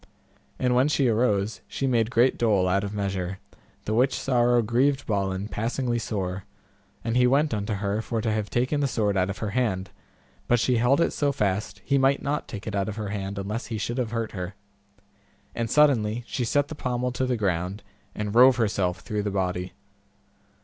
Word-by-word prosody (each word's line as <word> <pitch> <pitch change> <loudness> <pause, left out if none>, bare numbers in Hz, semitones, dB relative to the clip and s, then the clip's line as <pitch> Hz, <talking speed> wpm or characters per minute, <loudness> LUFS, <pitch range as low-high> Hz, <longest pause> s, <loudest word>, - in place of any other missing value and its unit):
And 125 -1 +1
when 125 +3 +4
she 140 -3 +2
arose 110 -3 +1
she 135 - -3
made 115 -4 +2
great 125 +2 +3
dole 105 -6 +2
out 100 +2 +1
of 100 - -3
measure, 95 -2 -3 0.5
the 110 - -1
which 125 +4 +2
sorrow 120 -2 +2
grieved 130 +5 +1
Balin 100 -1 -1
passingly 120 +3 -1
sore, 95 -3 -3 0.6
and 115 0 -1
he 125 0 +5
went 145 +3 +2
unto 105 +1 -2
her 100 +1 -1
for 115 0 -3
to 110 0 -1
have 105 -1 -2
taken 130 +5 0
the 140 - +2
sword 105 -5 0
out 95 0 +1
of 100 - -4
her 105 -2 -3
hand, 100 -5 -1 0.6
but 120 - +3
she 125 +1 +2
held 125 +7 +3
it - - +1
so 145 -1 +1
fast 100 -5 -2
he 140 0 +2
might 135 +1 +3
not 145 +2 -2
take 105 -2 -7
it 110 - -4
out 100 +1 0
of 105 - -5
her 105 -2 -4
hand 100 -1 -4
unless 105 +4 -4
he 115 - -4
should 120 +4 -3
have 120 -3 -1
hurt 115 -1 -3
her, 90 0 -5 1.0
and 115 -1 -2
suddenly 120 -6 +3
she 125 +1 -2
set 145 +4 +1
the - - -5
pommel 125 -3 -2
to 125 +1 -1
the 125 -1 0
ground, 95 0 -1 0.3
and 105 -1 -3
rove 125 +2 +7
herself 95 -6 0
through 105 +3 -3
the 105 - -2
body. 90 -2 -2
110 Hz, 200 wpm, -26 LUFS, 100-125 Hz, 1.0 s, rove